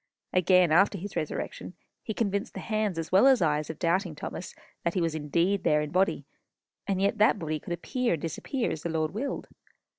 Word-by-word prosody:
Again, 180 -2 +4
after 195 +5 +4
his 195 +2 -7
resurrection, 155 -3 -4 0.3
he 220 - -5
convinced 200 +1 -1
the - - -4
hands, 215 -5 -1
as 165 -1 -4
well 195 +8 +6
as 265 -2 +6
eyes, 150 -2 +1
of 160 - -5
doubting 175 -1 0
Thomas, 165 +3 -7 0.3
that 170 - -1
he - - +2
was 165 -2 0
indeed 170 +6 0
there 150 0 +3
in 150 - -3
the - - -13
body; 190 +2 +1 0.6
and 195 -2 0
yet 200 +2 +1
that 215 +1 +5
body 155 -4 -3
could 175 - -5
appear 250 +6 -1
and 160 - -3
disappear 230 - -2
as 160 - -4
the 170 - -3
Lord 160 -1 -1
willed. 270 +7 -3
180 Hz, 210 wpm, -28 LUFS, 160-205 Hz, 0.6 s, well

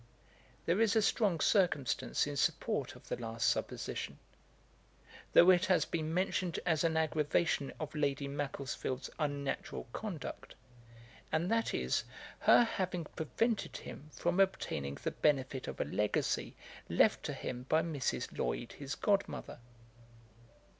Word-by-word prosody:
There 175 +6 +2
is 225 -1 +4
a 220 - +5
strong 200 -4 +2
circumstance 145 - +2
in 145 - -4
support 135 - 0
of - - -16
the - - -2
last 115 0 -2
supposition, - - -2 1.2
though 180 +2 +9
it 180 0 +3
has 180 -4 +4
been 160 -2 -2
mentioned 180 0 0
as 160 -4 +2
an 160 -1 +2
aggravation 155 -1 +1
of 155 - -5
Lady 145 -2 0
Macclesfield's 140 -2 -3
unnatural 145 -5 -2
conduct, 205 -8 -6 0.8
and 170 +5 +1
that 230 0 +1
is, - - 0 0.4
her - - +7
having 185 -6 -2
prevented 225 +8 -1
him 150 - -9
from 175 +4 0
obtaining 75 - +1
the - - 0
benefit 135 -3 +1
of - - -6
a - - +1
legacy 105 0 0 0.3
left - - +4
to - - -2
him 125 0 -5
by 160 +1 +4
Mrs. 150 -5 -2
Lloyd 115 - -2
his 140 0 -5
god 200 -1 +2
mother. - - -7
155 Hz, 135 wpm, -34 LUFS, 140-185 Hz, 1.2 s, though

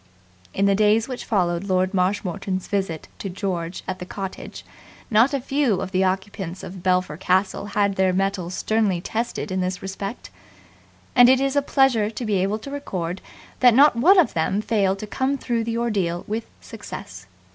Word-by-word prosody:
In 195 - 0
the 200 - +4
days 215 +2 +3
which 255 -2 -6
followed 180 -4 0
Lord 185 0 +1
Marshmoreton's 190 0 -1
visit 190 -6 -2
to 195 - -4
George 180 -2 -4
at 185 0 -4
the 180 - -6
cottage, 195 -1 -7 0.5
not 230 +5 +5
a 280 - 0
few 265 -6 +1
of 190 - -4
the 190 0 +2
occupants 190 -1 -3
of 185 0 -8
Belpher 180 -4 +1
Castle 190 +3 0
had 200 -1 0
their 190 -1 +3
mettle 190 -1 -1
sternly 205 0 0
tested 225 +2 -3
in 185 0 0
this 185 0 -3
respect; 195 +3 -6 0.8
and 245 0 +8
it 260 0 +5
is 275 +1 0
a 285 - +4
pleasure 270 -6 +2
to 230 +2 -5
be 210 -2 +1
able 200 +3 0
to 250 +6 -9
record 185 -11 -4 0.4
that 245 -3 +6
not 285 0 +6
one 350 +12 +5
of 355 - +4
them 170 +5 0
failed 200 -3 +1
to 215 - -6
come 265 +6 -1
through 235 -3 -1
the 230 0 -2
ordeal 195 -7 -1
with 220 +2 -3
success. 95 - -9
200 Hz, 180 wpm, -23 LUFS, 185-230 Hz, 0.8 s, and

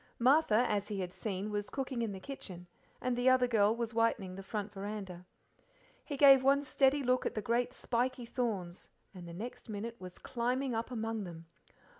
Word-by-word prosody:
Martha, 250 -2 +4
as 205 -1 0
he 205 -2 -3
had 180 -1 -4
seen, 205 0 -4
was 205 -1 -2
cooking 265 -3 -3
in 225 -3 -1
the 190 - -6
kitchen, 185 -8 -8 0.3
and 250 -1 -1
the 245 +1 +3
other 255 -1 +5
girl 220 -3 +3
was 235 -1 -3
whitening 230 -5 +1
the 195 - -7
front 205 +1 -4
veranda. 195 -3 -6 0.8
He 285 - -5
gave 275 -2 +8
one 275 +2 +4
steady 275 +1 +3
look 255 0 +2
at - - -5
the - - 0
great 240 +3 +1
spiky 250 0 -1
thorns, 210 -8 -3 0.2
and 180 -3 -9
the 170 - -8
next 235 +4 -7
minute 225 +3 -5
was 180 -1 -9
climbing 250 +2 -1
up 225 +2 -2
among 225 -3 -3
them. 165 -2 -9
230 Hz, 190 wpm, -33 LUFS, 200-255 Hz, 0.8 s, gave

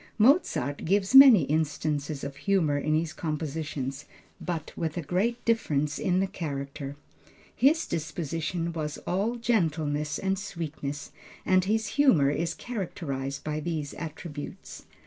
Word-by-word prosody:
Mozart 215 - +3
gives 195 +5 +1
many 265 - +10
instances 150 -1 -1
of 140 0 -5
humor 160 -2 +1
in 155 +2 +1
his 160 0 -1
compositions, 150 -3 -4 0.4
but 165 -3 -4
with 160 0 -3
a 170 - -2
great 215 +11 -1
difference 150 -11 +1
in 185 0 +1
the 195 - +2
character. 140 -5 -5 0.6
His 300 +5 +4
disposition 165 +2 -3
was 155 -2 -3
all 200 +7 0
gentleness 155 -10 0
and 195 0 -1
sweetness, 155 -8 -5 0.3
and 185 -1 +3
his 220 +2 +1
humor 210 - +4
is 165 +2 -1
characterized 145 - -4
by 155 0 -2
these 155 -2 -3
attributes. 155 - -8
160 Hz, 125 wpm, -28 LUFS, 145-195 Hz, 0.6 s, many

